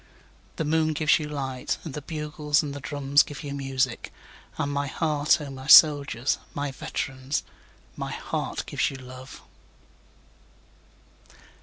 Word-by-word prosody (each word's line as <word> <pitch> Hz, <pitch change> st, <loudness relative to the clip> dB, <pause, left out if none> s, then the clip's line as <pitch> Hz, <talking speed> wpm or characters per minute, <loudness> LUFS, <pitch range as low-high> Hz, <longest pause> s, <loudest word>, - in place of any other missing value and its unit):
9The 160 Hz, -, -1 dB
moon 155 Hz, +1 st, +2 dB
gives 155 Hz, -1 st, +3 dB
you 150 Hz, -1 st, -5 dB
light, 135 Hz, -3 st, -3 dB
And 160 Hz, -, -7 dB
the 150 Hz, -, -5 dB
bugles 150 Hz, 0 st, -1 dB
and 145 Hz, -2 st, -4 dB
the 140 Hz, -, -6 dB
drums 140 Hz, +2 st, +2 dB
give 145 Hz, +2 st, -6 dB
you 140 Hz, -1 st, -5 dB
music; 135 Hz, -3 st, -2 dB, 0.5 s
And 145 Hz, -, -1 dB
my 140 Hz, 0 st, -1 dB
heart, 150 Hz, +2 st, +1 dB
O 145 Hz, -2 st, -7 dB
my 130 Hz, 0 st, -9 dB
soldiers, 145 Hz, -5 st, +6 dB, 0.2 s
my 145 Hz, -1 st, -2 dB
veterans, 135 Hz, +1 st, -3 dB, 0.5 s
My -, -, -5 dB
heart -, -, -4 dB
gives -, -, 0 dB
you -, -, -8 dB
love. 130 Hz, 0 st, -11 dB
145 Hz, 140 wpm, -26 LUFS, 135-150 Hz, 0.5 s, soldiers